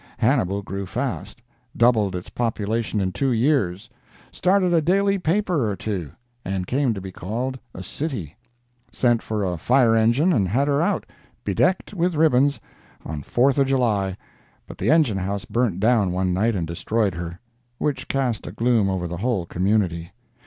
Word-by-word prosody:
Hannibal 105 Hz, -6 st, +1 dB
grew 95 Hz, 0 st, -5 dB
fast—doubled 120 Hz, -3 st, -1 dB
its 90 Hz, -, -6 dB
population 115 Hz, -1 st, -1 dB
in 95 Hz, -1 st, 0 dB
two 135 Hz, +7 st, 0 dB
years, 115 Hz, -, +1 dB, 0.4 s
started 185 Hz, -1 st, +2 dB
a 165 Hz, -, +4 dB
daily 195 Hz, +4 st, +2 dB
paper 175 Hz, -, +1 dB
or 100 Hz, -, -2 dB
two, 95 Hz, -8 st, -4 dB, 0.3 s
and 95 Hz, -1 st, -2 dB
came 130 Hz, +1 st, 0 dB
to -, -, -4 dB
be 95 Hz, 0 st, -7 dB
called 120 Hz, +9 st, -4 dB, 0.2 s
a 95 Hz, -, -6 dB
city—sent 120 Hz, -, -3 dB
for 105 Hz, -2 st, -2 dB
a 90 Hz, -3 st, -2 dB
fire 125 Hz, -, +4 dB
engine 120 Hz, +11 st, +3 dB
and 100 Hz, -, +2 dB
had 130 Hz, +10 st, +1 dB
her 145 Hz, +1 st, +2 dB
out, 190 Hz, +5 st, 0 dB, 0.4 s
bedecked 185 Hz, +3 st, +1 dB
with 180 Hz, -2 st, 0 dB
ribbons, 145 Hz, -2 st, +3 dB, 0.5 s
on 75 Hz, -2 st, -5 dB
Fourth 130 Hz, -, +2 dB
of 135 Hz, -, +3 dB
July, 105 Hz, -8 st, +1 dB, 0.5 s
but -, -, -11 dB
the -, -, 0 dB
engine 150 Hz, -11 st, +3 dB
house 100 Hz, +1 st, -3 dB
burned 115 Hz, -7 st, 0 dB
down 110 Hz, -3 st, +3 dB
one 90 Hz, 0 st, 0 dB
night 110 Hz, +5 st, +1 dB
and 85 Hz, -3 st, -1 dB
destroyed 100 Hz, +5 st, -1 dB
her, 85 Hz, 0 st, -6 dB, 0.4 s
which 135 Hz, -2 st, -2 dB
cast 130 Hz, -5 st, -1 dB
a -, -, -5 dB
gloom 115 Hz, -4 st, +2 dB
over 90 Hz, -2 st, -2 dB
the 85 Hz, +1 st, -5 dB
whole 105 Hz, -3 st, -1 dB
community. 90 Hz, -2 st, 0 dB
115 Hz, 160 wpm, -23 LUFS, 95-135 Hz, 0.5 s, a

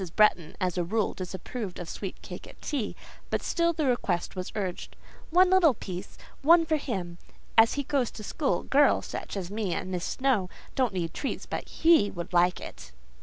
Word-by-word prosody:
Bretton, 195 Hz, -7 st, +3 dB
as 180 Hz, -2 st, 0 dB
a -, -, +2 dB
rule, 210 Hz, +4 st, 0 dB
disapproved 185 Hz, +2 st, -6 dB
of 175 Hz, -, -6 dB
sweet 190 Hz, +2 st, -6 dB
cake -, -, -8 dB
at -, -, -14 dB
tea, 265 Hz, -9 st, -3 dB, 0.3 s
but -, -, -1 dB
still 340 Hz, -1 st, +2 dB
the 315 Hz, -2 st, -1 dB
request 200 Hz, -10 st, 0 dB
was 185 Hz, -1 st, -4 dB
urged,—"One 315 Hz, -, 0 dB
little 345 Hz, -8 st, +6 dB
piece—only 275 Hz, -, +1 dB
for 315 Hz, -1 st, +2 dB
him—as 225 Hz, -1 st, 0 dB
he 285 Hz, -, -1 dB
goes 265 Hz, -3 st, 0 dB
to 215 Hz, -, -9 dB
school: 280 Hz, +7 st, -1 dB
girls—such 285 Hz, -6 st, +2 dB
as 185 Hz, -1 st, -4 dB
me 205 Hz, -4 st, -1 dB
and 185 Hz, -, -4 dB
Miss 180 Hz, -2 st, -2 dB
Snowe—don't 255 Hz, -1 st, -1 dB
need 170 Hz, -3 st, -2 dB
treats, 275 Hz, -, -3 dB
but -, -, -5 dB
he 320 Hz, -11 st, +4 dB
would 180 Hz, 0 st, -7 dB
like 175 Hz, +1 st, +4 dB
it." -, -, -10 dB
210 Hz, 170 wpm, -28 LUFS, 180-280 Hz, 0.3 s, little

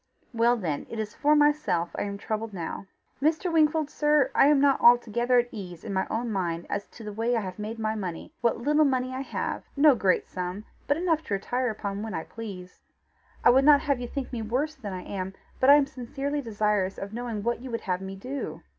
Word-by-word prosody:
Well 235 Hz, +1 st, +3 dB
then 160 Hz, -9 st, -3 dB
it 230 Hz, -, -6 dB
is 215 Hz, -1 st, -4 dB
for 300 Hz, 0 st, +3 dB
myself 295 Hz, -, +2 dB
I -, -, -2 dB
am 200 Hz, 0 st, -4 dB
troubled 215 Hz, +1 st, -4 dB
now. 180 Hz, +2 st, -5 dB, 0.3 s
Mr. 325 Hz, +4 st, +1 dB
Wingfold, 310 Hz, -1 st, +3 dB
sir, 295 Hz, -1 st, +2 dB
I -, -, +5 dB
am 295 Hz, -1 st, +5 dB
not 280 Hz, -1 st, +3 dB
altogether 240 Hz, +1 st, +4 dB
at 240 Hz, 0 st, +2 dB
ease 180 Hz, -6 st, -8 dB
in 205 Hz, -, -5 dB
my 190 Hz, -, 0 dB
own 230 Hz, +1 st, -2 dB
mind 170 Hz, -4 st, -2 dB
as 205 Hz, 0 st, -2 dB
to 230 Hz, -, -13 dB
the 210 Hz, -1 st, -6 dB
way 230 Hz, +3 st, 0 dB
I 230 Hz, -, +1 dB
have 185 Hz, 0 st, -7 dB
made 215 Hz, +2 st, -5 dB
my 220 Hz, -1 st, -1 dB
money 190 Hz, -, -5 dB
what 235 Hz, -2 st, +2 dB
little 295 Hz, +6 st, +3 dB
money 255 Hz, -2 st, 0 dB
I 260 Hz, -, -3 dB
have 275 Hz, -, -3 dB, 0.2 s
no 290 Hz, 0 st, +7 dB
great 195 Hz, -6 st, +1 dB
sum, 185 Hz, +3 st, -5 dB, 0.2 s
but 285 Hz, -, +2 dB
enough 330 Hz, -2 st, +1 dB
to 200 Hz, -, -1 dB
retire 245 Hz, +5 st, -1 dB
upon 200 Hz, -2 st, -4 dB
when 220 Hz, -4 st, -4 dB
I 160 Hz, -, -3 dB
please. 190 Hz, -5 st, -9 dB, 0.6 s
I -, -, +7 dB
would 265 Hz, +2 st, +5 dB
not 290 Hz, 0 st, +7 dB
have 280 Hz, -4 st, 0 dB
you 245 Hz, -, -4 dB
think 265 Hz, 0 st, -5 dB
me 235 Hz, -, -2 dB
worse 255 Hz, +8 st, -1 dB
than 230 Hz, -9 st, -7 dB
I 185 Hz, -1 st, -5 dB
am, 190 Hz, -1 st, -5 dB, 0.2 s
but 260 Hz, -, +4 dB
I 285 Hz, -, +10 dB
am 290 Hz, -1 st, +4 dB
sincerely 275 Hz, +3 st, -4 dB
desirous 210 Hz, -5 st, 0 dB
of 200 Hz, +1 st, -6 dB
knowing 230 Hz, -3 st, -4 dB
what 235 Hz, +1 st, -1 dB
you 260 Hz, -, -7 dB
would 230 Hz, -1 st, -3 dB
have 180 Hz, -1 st, -2 dB
me 190 Hz, 0 st, -6 dB
do." 260 Hz, +8 st, -6 dB
230 Hz, 230 wpm, -27 LUFS, 200-275 Hz, 0.6 s, I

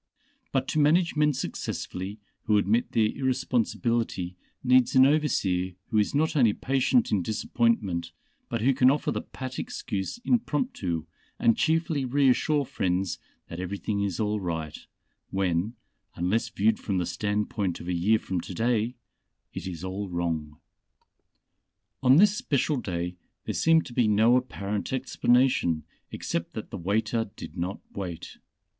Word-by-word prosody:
But -, -, 0 dB
to 155 Hz, -, +1 dB
manage 165 Hz, +4 st, +3 dB
men 150 Hz, 0 st, +4 dB
successfully 100 Hz, -6 st, -4 dB, 0.3 s
who 105 Hz, -1 st, +4 dB
admit 105 Hz, +4 st, +1 dB
their 110 Hz, -, +4 dB
irresponsibility 120 Hz, -7 st, -1 dB, 0.3 s
needs 130 Hz, 0 st, +4 dB
an 130 Hz, 0 st, +8 dB
overseer 100 Hz, -12 st, +1 dB, 0.2 s
who 110 Hz, -, +2 dB
is 105 Hz, -, +1 dB
not 160 Hz, +3 st, +1 dB
only 120 Hz, -7 st, +4 dB
patient 135 Hz, -, +1 dB
in 100 Hz, -, +2 dB
disappointment, 105 Hz, -3 st, 0 dB, 0.4 s
but 115 Hz, -2 st, -2 dB
who 135 Hz, +4 st, +4 dB
can 125 Hz, 0 st, +5 dB
offer 145 Hz, +2 st, +1 dB
the -, -, -2 dB
pat 130 Hz, -1 st, -7 dB
excuse 95 Hz, -, -4 dB
impromptu, 230 Hz, -, 0 dB, 0.3 s
and 115 Hz, -1 st, +4 dB
cheerfully 160 Hz, -3 st, +1 dB
reassure 140 Hz, +2 st, +2 dB
friends 95 Hz, -8 st, -1 dB, 0.3 s
that 85 Hz, -, -7 dB
everything 100 Hz, +2 st, -2 dB
is 100 Hz, -4 st, -2 dB
all 105 Hz, -1 st, 0 dB
right, 80 Hz, -5 st, -4 dB, 0.4 s
when 95 Hz, +3 st, 0 dB, 0.4 s
unless 110 Hz, +7 st, 0 dB
viewed 110 Hz, -1 st, +1 dB
from 100 Hz, -3 st, -2 dB
the 90 Hz, -, 0 dB
standpoint 100 Hz, +1 st, -1 dB
of 85 Hz, -, -9 dB
a 90 Hz, -, 0 dB
year 95 Hz, +6 st, +3 dB
from 95 Hz, -4 st, -3 dB
to 90 Hz, -, -8 dB
day 115 Hz, +2 st, +1 dB, 0.6 s
it 95 Hz, -, -5 dB
is 85 Hz, -3 st, -6 dB
all 95 Hz, +1 st, -4 dB
wrong. 80 Hz, -4 st, -3 dB, 1.4 s
On 130 Hz, 0 st, +6 dB
this 205 Hz, +3 st, +6 dB
special 145 Hz, -5 st, 0 dB
day 90 Hz, -5 st, -3 dB, 0.3 s
there -, -, -2 dB
seemed 165 Hz, 0 st, +4 dB
to 120 Hz, -, -9 dB
be 120 Hz, -2 st, +3 dB
no 110 Hz, +3 st, +5 dB
apparent 105 Hz, -5 st, -2 dB
explanation 125 Hz, -9 st, +2 dB, 0.3 s
except -, -, -3 dB
that -, -, -7 dB
the -, -, -4 dB
waiter 110 Hz, +4 st, 0 dB
did 80 Hz, -, -9 dB
not 90 Hz, +2 st, -3 dB
wait. 90 Hz, -4 st, -6 dB
110 Hz, 145 wpm, -27 LUFS, 95-130 Hz, 1.4 s, an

